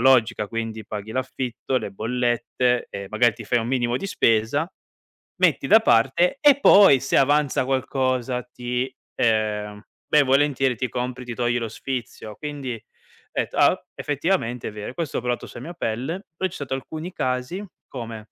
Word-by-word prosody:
logica, 115 -5 +3
quindi 115 -2 -4
paghi 105 +1 -6
l'affitto, 130 0 -3
le 100 - -6
bollette 125 +2 0
e 100 0 -6
magari 110 +1 +3
ti 115 - -9
fai 120 +3 +1
un 115 - -4
minimo 120 -2 +1
di 195 - -4
spesa, 115 - +2 0.7
metti - - +2
da 220 +1 +7
parte 135 - +3
e 285 -2 +6
poi 195 - +7
se 135 - -1
avanza 145 -1 +3
qualcosa 130 -1 0
ti 125 +1 -3 0.3
ehm 105 -2 0 0.3
ben 150 -1 +4
volentieri 135 -1 +2
ti 125 +2 -2
compri 125 0 -4
ti 120 - -6
togli 120 0 0
lo 115 -2 -3
sfizio!". 115 -3 -6
Quindi 145 -5 -5 0.6
etto: - - -2
"Ah - - +6
o - - -7
effettivamente 145 -5 -1
è - - -5
vero.". 105 -1 -6
E - - -14
questo 160 -2 -3
ho - - -8
provato 125 -1 -2
sua - - -10
mia 170 - -7
pelle; 145 - -3
però 185 +2 -1
c'è - - -11
stato 135 -2 -4
alcuni 155 +7 -5
casi 130 +11 -2 0.2
come: 115 -4 -8
125 Hz, 170 wpm, -23 LUFS, 115-135 Hz, 0.7 s, da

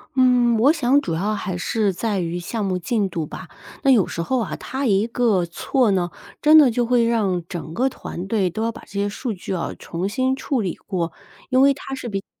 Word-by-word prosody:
嗯， 250 -2 +4
我 275 +6 +6
想 280 -3 +3
主 165 - -2
要 205 +5 -1
还 185 -3 -3
是 210 +3 0
在 200 +2 -2
于 170 0 -2
项 215 +5 -3
目 185 -2 0
进 200 +2 -1
度 165 -2 -3
吧， - - -9 0.3
那 275 - +2
有 225 -9 +5
时 170 - -4
候 255 +9 0
啊， - - -3
他 270 +1 -4
一 205 -1 +2
个 230 -6 +2
错 235 - +1
呢， 180 -3 0 0.3
真 305 +1 +6
的 280 - +6
就 240 +1 0
会 240 0 +3
让 205 -7 +1
整 165 -3 -6
个 260 +6 +1
团 185 -7 -7
队 200 -3 +1
都 220 - -4
要 230 - 0
把 - - -12
这 - - -17
些 200 0 -1
数 230 +3 -4
据 190 0 -6
啊 175 - -2
重 175 +3 -3
新 260 +5 0
处 265 -3 -1
理 185 -4 -2
过。 170 -4 -3 0.4
因 260 0 +4
为 275 0 +6
他 270 0 -7
是 250 -3 -6
比 195 - -2
较 - - -15
215 Hz, 250 characters per minute, -22 LUFS, 185-250 Hz, 0.4 s, 我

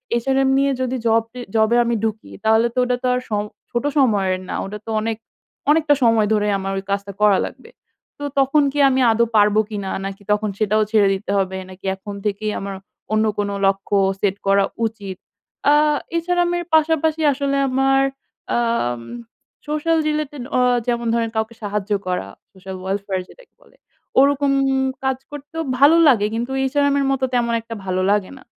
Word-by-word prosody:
HRM 265 +3 +1
নিয়ে 275 0 +2
যদি 255 0 -1
job 225 0 +3
জি 250 - -8 0.2
জবে 220 +1 +3
আমি 235 - 0
ঢুকি, 220 -1 -3
তাহলে 220 +2 +4
তো - - -15
ঐটা 250 0 +1
তো - - +1
আর 250 - +1
সম 205 -1 0 0.3
ছোট 240 - -1
সময়ের 200 -8 +2
না। - - -3
ওটা 205 +2 -6
তো - - -8
অনেক 225 0 -2 0.5
অনেকটা 305 -1 +4
সময় 225 -2 +4
ধরে 210 -1 +1
আমার 195 0 -4
ওই 195 - -4
কাজটা 200 0 -2
করা 205 -2 +5
লাগবে। - - -11 0.5
তো 290 - -6 0.2
তখন 275 +2 +3
কি 290 - -3
আমি 265 0 +1
আদো 230 +1 +3
পারব 210 0 +4
কিনা? 200 -3 -4 0.2
নাকি 195 +1 -6
তখন 210 0 +1
সেটাও 215 0 +2
ছেড়ে 210 -3 +4
দিতে 195 +1 -5
হবে? 190 -1 -1
নাকি 185 +1 -13
এখন 200 +2 -9
থেকেই 210 +1 -1
আমার 195 0 -5 0.4
অন্য 215 0 +3
কোনো 200 -1 -1
লক্ষ্য 195 0 0 0.3
সেট 195 -1 +1
করা 195 0 +4 0.2
উচিত? 205 -4 -5 0.6
আ - - +6 0.4
এছাড়া 350 +1 0
আমি 350 0 0 0.2
পাশাপাশি 315 0 +2
আসলে 275 0 -1
আমার 270 +1 +2 0.5
আম 230 - 0 0.7
সোশ্যাল 305 +2 0
রিলেটেড 300 -3 -3
আ - - +3 0.3
যেমন 235 -1 -1
ধরেন 230 -1 0
কাউকে 220 +1 -2
সাহায্য 205 0 -3 0.2
করা, 180 - -2 0.3
সোশ্যাল 190 0 -9
ওয়েলফেয়ার 195 0 -2
যেটাকে - - -18
বলে। - - -23 0.4
ওরকম 280 0 +3 0.5
কাজ 265 -1 0
করতেও 295 +3 -6 0.2
ভালো 295 +4 +7
লাগে 220 -7 +4
কিন্তু 240 +3 -3
এইচআরএম 285 +1 +1
এর 275 - +1
মতো 265 -1 0
তেমন 235 -1 +1
একটা 230 0 -8
ভালো 185 0 -1
লাগে 205 -2 0
না। - - -15
225 Hz, 175 wpm, -20 LUFS, 200-270 Hz, 0.7 s, ভালো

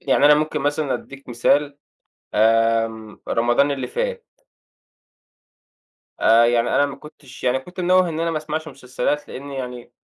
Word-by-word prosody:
يعني - - +2
أنا 150 0 +8
ممكن 155 0 -1
مثلًا 145 0 -1
أديك 140 -1 -9
مثال 140 +4 +1 0.6
آمم 115 0 +1
رمضان 120 +5 +2
اللي 140 -1 -3
فات. 485 -1 -4 1.9
آآ 115 +1 +5
يعني 120 0 +2
أنا 145 - +2
ما 140 -1 -7
كنتش 140 -2 -14
يعني 125 +1 +2
كنت 180 +8 -10
منوَّه 180 0 +3
إن 160 -1 -4
أنا 165 0 0
ما 165 - -3
أسمعش 155 +1 -5
مسلسلات؛ 135 +1 -3
لإن 140 +2 -8
يعني 125 -3 -7
140 Hz, 150 wpm, -21 LUFS, 120-155 Hz, 1.9 s, أنا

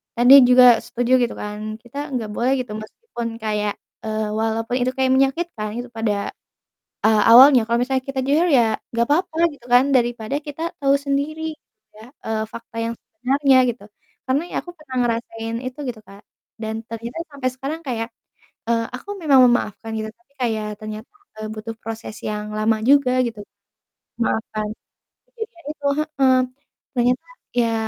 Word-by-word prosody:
tadi 245 +3 +7 0.2
juga 250 0 +8 0.2
setuju 245 +1 -1
gitu 240 - -1
kan, 215 +1 -6
kita 240 +3 -12 0.2
enggak 225 -4 -2
boleh 255 +3 +2
gitu 240 -4 -8
meskipun 235 - -7 0.2
kayak, 210 -1 0 0.3
eee, 215 0 -1
walaupun 225 +2 -1
itu 255 +1 +1
kayak 260 -1 +2
menyakitkan 270 -4 0
itu 245 - -5
pada, 215 -3 -2 0.8
eee, 215 -1 +4
awalnya. 255 +1 +9
Kalau 235 - +3
misalnya 260 0 0
kita 270 -1 -4
jujur 320 +5 +3
ya 230 -6 +3
enggak 235 0 +1
apa-apa 325 +2 +1 0.2
gitu 245 -3 -18
kan, 245 +2 +6
daripada 240 +1 0
kita 295 +2 -7 0.2
tahu 275 0 +4
sendiri, 300 +3 -2 0.4
ya, 220 +2 -12 0.2
eee 220 -1 -1
fakta 230 0 -10
yang 230 - -2
sebenarnya 275 -2 +2
gitu. 220 -3 -9 0.4
Karena 270 +4 +1
ya - - -5
aku 350 - -9
pernah 265 -4 -8
ngerasain 230 -1 -3
itu 255 +3 -6
gitu, 230 -3 -5
Kak. 200 +1 -14 0.4
Dan 220 0 -3
ternyata 230 +6 -6
sampai 265 -2 -1
sekarang 280 +5 -5
kayak, 230 -3 -2 0.6
eee, 230 -1 +1
aku 330 - -14
memang 275 -4 +6
memaafkan 225 -2 0
gitu, 215 - -3
tapi 355 -6 -37
kayak 215 -2 -2
ternyata, 215 - -7 0.3
eee, 215 - -4
butuh 225 +1 -6
proses 225 -1 -6
yang 210 0 -3
lama 220 +1 +1
juga 260 -2 +4
gitu 225 -3 -6 0.8
memaafkan 220 -2 -1 0.7
kejadian 445 -8 -8
itu 290 -2 -6
heeh. 275 -4 +2 0.6
Ternyata 245 - +1 0.3
ya 230 -2 +2
240 Hz, 155 wpm, -21 LUFS, 220-275 Hz, 0.8 s, awalnya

